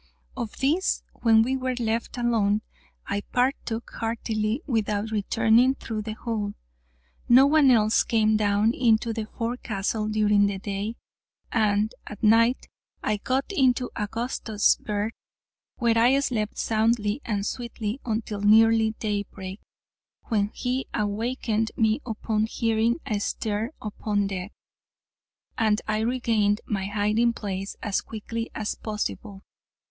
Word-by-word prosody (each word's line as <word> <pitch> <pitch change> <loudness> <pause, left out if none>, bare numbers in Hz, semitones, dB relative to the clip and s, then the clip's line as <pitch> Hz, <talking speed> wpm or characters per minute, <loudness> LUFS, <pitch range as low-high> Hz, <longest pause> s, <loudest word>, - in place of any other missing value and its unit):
Of 220 - -5
this, 310 +8 +1
when 225 -1 +4
we 260 +3 0
were 255 -1 -2
left 230 0 -2
alone, 220 -3 +1 0.4
I 200 0 -2
partook 245 -1 -1
heartily, 225 +2 -1
without 220 -4 -1
returning 225 +4 +3
through 220 -4 -5
the 215 0 -5
hole. 215 -3 -3 0.7
No 255 +3 +8
one 290 -1 +5
else 220 -3 +4
came 220 -1 +2
down 210 +1 +2
into 230 -2 +2
the 220 -1 -4
forecastle 220 -3 -2
during 210 -1 +3
the 200 -1 -2
day, 200 +3 -4 0.6
and 215 -1 +2
at 210 - -9
night, 230 +3 +4 0.4
I 215 - +1
got 260 - -1
into 255 -7 +2
Augustus' 220 0 0
berth, 210 +1 -3 0.6
where 235 -2 +2
I 250 +4 +5
slept 225 -6 -2
soundly 220 +1 +1
and 205 -3 -2
sweetly 235 0 -4
until 215 -3 -3
nearly 220 +1 +5
daybreak, 200 -2 -4 0.7
when 210 -3 +2
he 250 +4 -3
awakened 220 +1 -1
me 220 +4 +2
upon 220 -1 -1
hearing 225 0 +1
a 215 -6 -1
stir 215 +2 -2
upon 210 -1 -2
deck, 195 0 -4 1.1
and 215 -1 +3
I 215 0 0
regained 220 -3 +1
my 195 -2 -2
hiding 210 +3 +1
place 195 -3 -5
as 205 - 0
quickly 230 +1 -5
as 215 -1 -2
possible. 210 -1 -5
220 Hz, 125 wpm, -25 LUFS, 210-235 Hz, 1.1 s, No